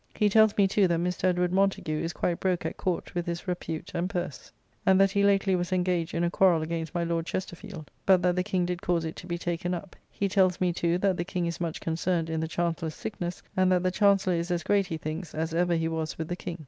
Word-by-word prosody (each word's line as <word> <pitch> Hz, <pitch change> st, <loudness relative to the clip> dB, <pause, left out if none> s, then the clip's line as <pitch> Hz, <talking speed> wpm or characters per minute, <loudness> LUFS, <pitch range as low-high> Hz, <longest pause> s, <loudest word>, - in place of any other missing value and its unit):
He 210 Hz, -, +3 dB
tells 220 Hz, 0 st, +5 dB
me 200 Hz, -2 st, +5 dB
too 195 Hz, 0 st, +3 dB
that 170 Hz, -1 st, +1 dB
Mr. 180 Hz, +1 st, -1 dB
Edward 180 Hz, -1 st, +2 dB
Montagu 190 Hz, -5 st, +1 dB
is 165 Hz, -, -2 dB
quite 175 Hz, -1 st, -1 dB
broke 185 Hz, -2 st, 0 dB
at -, -, -3 dB
Court 180 Hz, -2 st, -2 dB
with 175 Hz, 0 st, -2 dB
his 170 Hz, +3 st, -4 dB
repute 165 Hz, -3 st, -4 dB
and 175 Hz, +2 st, -1 dB
purse; 175 Hz, -7 st, -5 dB, 0.3 s
and 190 Hz, 0 st, +4 dB
that 195 Hz, 0 st, +5 dB
he 200 Hz, 0 st, +1 dB
lately 195 Hz, -1 st, +3 dB
was 175 Hz, 0 st, -2 dB
engaged 180 Hz, -2 st, 0 dB
in 170 Hz, -, +1 dB
a 170 Hz, -, +1 dB
quarrell 175 Hz, -5 st, +4 dB
against 165 Hz, +1 st, -4 dB
my 170 Hz, -, +1 dB
Lord 165 Hz, 0 st, -1 dB
Chesterfield: 180 Hz, -3 st, -6 dB, 0.2 s
but 185 Hz, -2 st, +5 dB
that 180 Hz, -1 st, +3 dB
the 180 Hz, -, +2 dB
King 185 Hz, -2 st, 0 dB
did 175 Hz, 0 st, -3 dB
cause 175 Hz, -4 st, 0 dB
it 160 Hz, -, -5 dB
to 180 Hz, -, -9 dB
be 175 Hz, -1 st, -2 dB
taken 175 Hz, +1 st, -2 dB
up. 175 Hz, +2 st, -8 dB
He 200 Hz, -, -1 dB
tells 185 Hz, -2 st, +2 dB
me, 180 Hz, -1 st, +1 dB
too, 170 Hz, 0 st, +1 dB
that 190 Hz, -1 st, +1 dB
the 175 Hz, -, -1 dB
King 180 Hz, -1 st, -2 dB
is 170 Hz, 0 st, -4 dB
much 165 Hz, -2 st, -2 dB
concerned 165 Hz, 0 st, -1 dB
in 160 Hz, -, -1 dB
the 160 Hz, -, -1 dB
Chancellor's 165 Hz, -1 st, -2 dB
sickness, 175 Hz, -4 st, -5 dB
and 185 Hz, 0 st, +3 dB
that 180 Hz, -1 st, +3 dB
the 185 Hz, -, +2 dB
Chancellor 195 Hz, -2 st, +3 dB
is 170 Hz, +1 st, -1 dB
as 175 Hz, -1 st, -1 dB
great, 200 Hz, -2 st, +2 dB
he 165 Hz, -, -3 dB
thinks, 155 Hz, +3 st, -6 dB
as 160 Hz, +1 st, -2 dB
ever 175 Hz, +1 st, +2 dB
he 165 Hz, 0 st, 0 dB
was 160 Hz, -1 st, -3 dB
with 160 Hz, -1 st, -4 dB
the 175 Hz, -, -1 dB
King. 175 Hz, -1 st, -6 dB
175 Hz, 260 wpm, -28 LUFS, 170-185 Hz, 0.3 s, tells